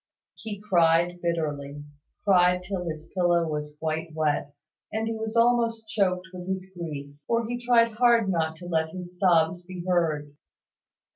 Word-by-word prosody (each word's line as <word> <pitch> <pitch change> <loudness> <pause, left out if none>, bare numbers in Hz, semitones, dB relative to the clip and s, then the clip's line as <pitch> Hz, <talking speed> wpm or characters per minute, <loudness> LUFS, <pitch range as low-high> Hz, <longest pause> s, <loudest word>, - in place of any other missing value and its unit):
He 215 -3 -7
cried 175 -3 +2
bitterly, 150 -4 -2 0.4
cried 180 -2 +4
till 180 -1 -4
his 155 -1 -5
pillow 175 -2 +2
was 150 -1 -4
quite 160 0 -3
wet, 150 -2 0 0.4
and 220 +1 -1
he 225 - -1
was 220 0 -4
almost 230 -1 +2
choked 185 -3 0
with 180 0 -8
his 190 0 -4
grief; 145 -5 -6
for 230 -1 +1
he 245 +1 -4
tried 235 -1 +4
hard 235 -3 +4
not 160 -4 0
to 175 - -11
let 160 -2 0
his 180 0 -9
sobs 170 -2 +3
be 180 -1 -8
heard. 155 -5 0
175 Hz, 155 wpm, -26 LUFS, 160-205 Hz, 0.4 s, cried